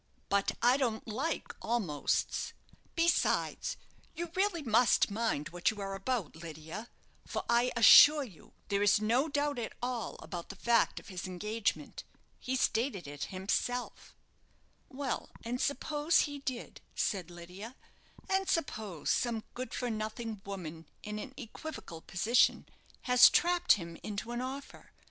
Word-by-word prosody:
"But 200 0 +2
I 245 +2 +6
don't 235 -6 -1
like 270 +9 -2
'almosts.' 195 -12 -1 0.4
Besides, 340 +8 +1 0.4
you 340 0 -4
really 375 -4 +1
must 230 -3 +4
mind 210 -9 -1
what 175 0 +1
you 215 - -5
are 195 -1 -4
about, 195 - -2
Lydia; 160 +6 -8 0.4
for - - -3
I 240 +1 +3
assure 285 +6 +9
you 195 - -14 0.2
there 200 0 +1
is 205 0 +5
no 240 +8 +2
doubt 290 -2 0
at 225 - -4
all 245 -2 -3
about 175 -2 -6
the 195 - -7
fact 235 +4 +2
of - - -14
his 185 -1 -5
engagement. 210 +4 -2 0.4
He 260 - -2
stated 225 - 0
it 145 0 -5
himself." 200 +6 -3 0.7
"Well, 265 -2 -3
and 245 +2 -3
suppose 295 +3 +2
he 290 -1 -3
did," 260 -3 -5
said 185 -5 -1
Lydia, 180 +7 -9 0.5
"and 385 0 +1
suppose 215 - -1
some 230 -3 0
good 255 +1 -5
for 245 -1 -2
nothing 220 0 -4
woman, 170 -5 -7
in 210 0 -5
an 260 +4 -8
equivocal 235 - -8
position, 220 +10 +2 0.4
has 250 -1 +8
trapped 355 0 +4
him 170 -4 -5
into 215 +2 -5
an 240 +1 -2
offer. 265 +2 -7
230 Hz, 140 wpm, -32 LUFS, 195-260 Hz, 0.7 s, assure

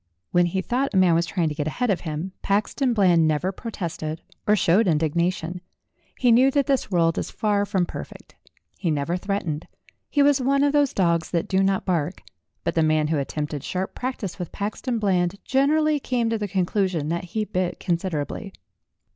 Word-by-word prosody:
When 175 0 +4
he 190 +2 -2
thought 250 +1 -1
a - - +4
man 185 -2 +5
was 170 +1 +2
trying 170 -4 0
to - - -3
get 150 0 -3
ahead 245 +8 0
of 190 - -1
him, 160 +3 -4
Paxton 215 +6 +1
Bland 175 -6 +4
never 155 +5 0
protested 170 -7 -5 0.2
or 210 - +5
showed 195 +2 +3
indignation; 170 +2 0 0.6
he 245 -2 +3
knew 255 +4 +6
that 280 0 +1
this 275 -5 0
world 165 -3 +2
is - - -4
far 205 -2 0
from 190 -3 +1
per - - -6
fect. - - -15 0.5
He 175 - -1
never 150 +2 0
threatened. 180 -5 -3 0.4
He 285 - +3
was 285 -1 +4
one 275 +2 +2
of 285 0 +2
those 290 -2 +3
dogs 170 -4 +1
that 170 -2 -1
do 190 0 +2
not 195 0 +1
bark, 175 -1 -1 0.4
but - - -1
the 165 - +2
man 155 -1 +2
who 155 -2 +1
attempted 150 0 -3
sharp 185 +3 -3
practice 245 -8 -4
with 175 - -5
Paxton 215 +4 -3
Bland 185 -4 +1
generally 300 +3 +2
came 240 -4 -1
to 225 - +1
the 205 - -2
conclusion 185 -4 0
that 170 +2 -2
he 215 +5 -2
bit 185 -3 -2
considerably. 175 +2 -2
185 Hz, 190 wpm, -24 LUFS, 165-220 Hz, 0.6 s, knew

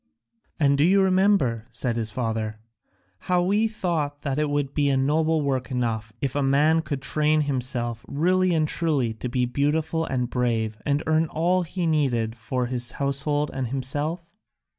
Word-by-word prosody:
"And 140 -2 +3
do - - +5
you 190 +4 +4
remember," 185 - +2
said 115 +1 -2
his 115 -2 -1
father, 110 -1 -3 0.7
"how 180 -1 +3
we 205 +5 +2
thought 160 -9 -2
that 140 0 -1
it 150 -1 0
would 145 -1 -1
be 145 -1 +2
a 135 - +2
noble 155 +3 +1
work 130 -2 -1
enough 115 -4 -2
if 135 -2 -1
a 145 - +1
man 150 +4 +3
could 140 -3 -5
train 155 +1 +2
himself 125 -4 -2
really 180 +4 +2
and 155 -1 +2
truly 145 -9 0
to 115 +3 -5
be 125 0 0
beautiful 150 +5 0
and 130 -5 -1
brave 115 -3 -1
and 145 +1 +1
earn 160 +1 +2
all 175 +4 +1
he 175 +1 -3
needed 125 -8 +1
for 120 +2 -2
his 120 -1 -2
household 145 +1 0
and 130 -2 -2
himself? 145 - -2
140 Hz, 170 wpm, -24 LUFS, 125-160 Hz, 0.7 s, do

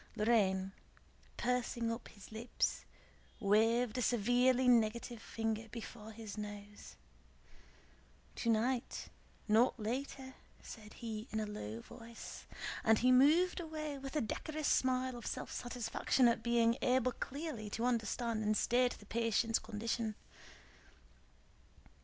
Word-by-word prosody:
Lorrain, 195 -4 +2 0.7
pursing 240 -1 0
up 230 +1 -5
his 205 - -14
lips, 225 +3 -1 0.5
waved 225 +3 +3
a - - 0
severely 245 +3 +3
negative 235 0 +2
finger 225 0 -2
before 220 -1 -8
his 215 -1 -7
nose. 205 0 -8 1.4
"Tonight, 235 +2 0 0.4
not 230 +3 +4
later," 260 +4 -4 0.3
said 215 -2 -10
he 220 -1 -5
in 220 - -2
a 215 - -1
low 115 - -6
voice, 230 0 -10 0.4
and 225 -1 +5
he 255 +3 +4
moved 310 +9 +5
away 305 -4 -4
with 270 +2 -7
a 300 - +2
decorous 310 +7 -3
smile 255 0 +2
of 240 - -7
self - - -4
satisfaction 245 +1 +1
at 230 -1 +2
being 235 0 +3
able 255 0 +3
clearly 270 -4 -5
to 225 +3 -2
understand 230 -1 0
and 215 0 +2
state 245 +1 +3
the 205 - -15
patient's 230 +1 +1
condition. 220 0 -2
230 Hz, 120 wpm, -35 LUFS, 215-250 Hz, 1.4 s, and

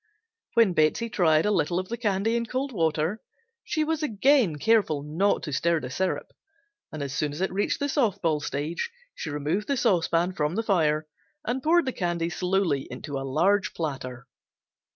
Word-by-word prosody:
When 230 -6 +5
Betsey 165 +9 +1
tried 160 -5 +3
a 210 - +2
little 175 -3 +1
of 185 0 -3
the 235 - -2
candy 220 -1 0
in 235 0 -1
cold 265 +4 -2
water 165 +1 0 0.4
she 310 - 0
was 320 0 -1
again 255 - +3
careful 180 -6 +2
not 165 +7 +1
to 150 - -4
stir 170 +4 +2
the 125 - -7
syrup, 190 +7 -2 0.6
and 155 -2 -4
as 140 -1 -4
soon 145 0 -1
as 150 - -7
it 190 0 -1
reached 200 +2 0
the 285 - 0
soft 260 - +1
ball 155 -3 +1
stage 150 - -3 0.2
she - - -6
removed 150 +8 -2
the 280 - 0
saucepan 175 -3 +2
from 150 0 -1
the 225 - 0
fire 155 -7 +2 0.4
and 250 +3 -1
poured 335 +3 +3
the 260 - -2
candy 170 -2 -1
slowly 180 -5 0
into 145 -2 -5
a 135 0 -5
large 190 +8 +2
platter. 130 -6 -4
180 Hz, 185 wpm, -26 LUFS, 155-225 Hz, 0.6 s, When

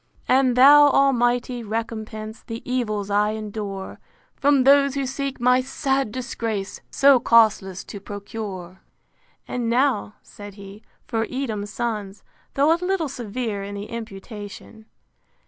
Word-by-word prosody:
VII. - - -38
And 260 -2 +3
thou, 290 +3 +8
Almighty! 245 -3 +2
recompense 220 0 -5
The 230 -1 -8
evils 215 -5 -2
I 210 +1 +2
endure 205 -3 -6 0.4
From 280 -2 +3
those 280 0 +5
who 275 -1 -1
seek 275 +1 -4
my 250 +1 +4
sad 270 -2 -1
disgrace, 225 -5 -4
So 275 -2 +5
causeless, 215 -6 +3
to 205 - -9
procure. 200 -3 -7 0.7
And 240 -2 -2
now, 245 -4 +1
said 205 -1 -11
he, 200 +1 -11 0.2
for 225 -1 -2
Edom's 220 -6 -3
Sons. 210 -2 -4 0.3
Though 285 +4 +4
a 335 - -2
little 360 -5 0
severe 230 -4 -4
in 200 +1 -6
the 200 0 -5
imputation. 215 0 -9
230 Hz, 130 wpm, -23 LUFS, 205-260 Hz, 0.7 s, thou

